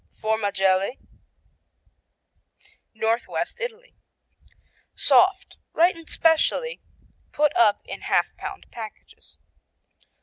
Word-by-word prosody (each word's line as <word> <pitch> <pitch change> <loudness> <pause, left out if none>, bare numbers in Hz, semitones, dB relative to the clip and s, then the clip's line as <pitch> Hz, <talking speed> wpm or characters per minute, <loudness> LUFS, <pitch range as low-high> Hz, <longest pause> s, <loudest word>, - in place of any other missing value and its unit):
Formagelle 200 -1 0 2.0
Northwest 225 - -1
Italy 485 0 -7 1.0
Soft, 385 +1 +3 0.2
ripened 335 -1 +2
specialty 410 +9 +1 0.5
put 300 0 +1
up 210 -3 +4
in - - -8
half - - 0
pound - - -8
packages. 220 -3 -11
295 Hz, 70 wpm, -24 LUFS, -, 2.0 s, up